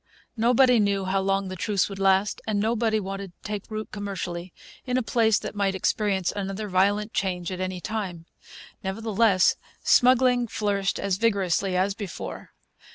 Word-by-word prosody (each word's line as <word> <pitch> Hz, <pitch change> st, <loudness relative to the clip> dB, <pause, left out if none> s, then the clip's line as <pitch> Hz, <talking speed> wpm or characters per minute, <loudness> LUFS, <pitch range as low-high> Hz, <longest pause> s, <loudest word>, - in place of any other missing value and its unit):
Nobody 245 Hz, +1 st, +4 dB
knew 200 Hz, -2 st, +1 dB
how 190 Hz, +1 st, +1 dB
long 195 Hz, 0 st, 0 dB
the 185 Hz, -, -5 dB
truce 195 Hz, +2 st, 0 dB
would 195 Hz, -1 st, -8 dB
last; 195 Hz, +1 st, +2 dB
and 210 Hz, -2 st, 0 dB
nobody 220 Hz, 0 st, +1 dB
wanted 195 Hz, -2 st, -6 dB
to -, -, -11 dB
take 210 Hz, -1 st, -5 dB
root 215 Hz, 0 st, -5 dB
commercially 185 Hz, -3 st, -5 dB, 0.3 s
in 250 Hz, -1 st, -1 dB
a 255 Hz, -, +1 dB
place 220 Hz, -1 st, +3 dB
that -, -, -5 dB
might 200 Hz, -2 st, 0 dB
experience 190 Hz, -1 st, 0 dB
another 200 Hz, +1 st, -4 dB
violent 200 Hz, +3 st, +1 dB
change 180 Hz, -2 st, -2 dB
at 185 Hz, -, -5 dB
any 185 Hz, -1 st, -3 dB
time. 185 Hz, -5 st, -4 dB, 0.6 s
Nevertheless, 200 Hz, -1 st, +2 dB, 0.3 s
smuggling 250 Hz, -1 st, +4 dB
flourished 200 Hz, -3 st, -1 dB
as 195 Hz, -2 st, -1 dB
vigorously 195 Hz, -4 st, +1 dB
as 195 Hz, +2 st, +1 dB
before. 200 Hz, -3 st, -7 dB
200 Hz, 160 wpm, -25 LUFS, 190-220 Hz, 0.6 s, Nobody